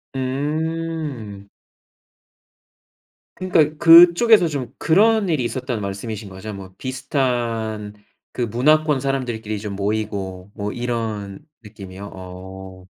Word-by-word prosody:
음. 145 -5 -3 1.9
그러니까 155 -5 +2
그쪽에서 175 +5 +7
좀 135 -6 -4
그런 210 +4 +3
일이 150 -6 +1
있었다는 125 -2 -3
말씀이신 100 +1 -5
거죠. 95 +3 -8
뭐 95 -1 -9
비슷한 120 -5 -2 0.4
그 - - -5
문화권 145 +5 +2
사람들끼리 120 -6 -3
좀 105 -1 -5
모이고 100 -2 -3
뭐 105 -1 -4
이런 110 -5 -4 0.2
느낌이요. 100 -2 -10
어. 95 0 -10
115 Hz, 225 characters per minute, -21 LUFS, 100-150 Hz, 1.9 s, 그쪽에서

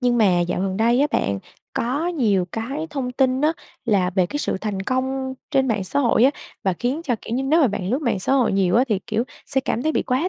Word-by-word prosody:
Nhưng 245 -1 +2
mà 185 -5 +4
dạo 175 +1 -1
gần 190 -1 -1
đây 235 +4 +3
á 290 - +4
bạn 100 - 0 0.3
có 275 +8 -1
nhiều 220 - +1
cái 270 +8 -3
thông 255 -4 -3
tin 260 0 +2
á, 305 +2 +3 0.3
là 195 -5 +2
về 185 -1 +2
cái 290 - -4
sự 290 - -1
thành 200 -3 -3
công 260 +2 -1 0.2
trên 265 -1 +2
mạng 210 -4 0
xã 285 - 0
hội 245 -2 +4
á, 275 - +6 0.3
và 190 - +2
khiến 245 - -2
cho, 250 - +1
kiểu 230 - -4
như 265 - 0
nếu 310 +5 +3
mà 280 - +5
bạn 195 -1 -3
lướt 270 +5 0
mạng 230 -7 +1
xã 265 - 0
hội 260 -4 +3
nhiều 195 0 +2
á 250 - +5
thì, 210 -4 +1
kiểu, 230 +1 0 0.2
sẽ 265 - +1
cảm 245 -2 -2
thấy 315 - +1
bị - - +1
quá 270 +8 0
245 Hz, 265 wpm, -22 LUFS, 200-270 Hz, 0.3 s, á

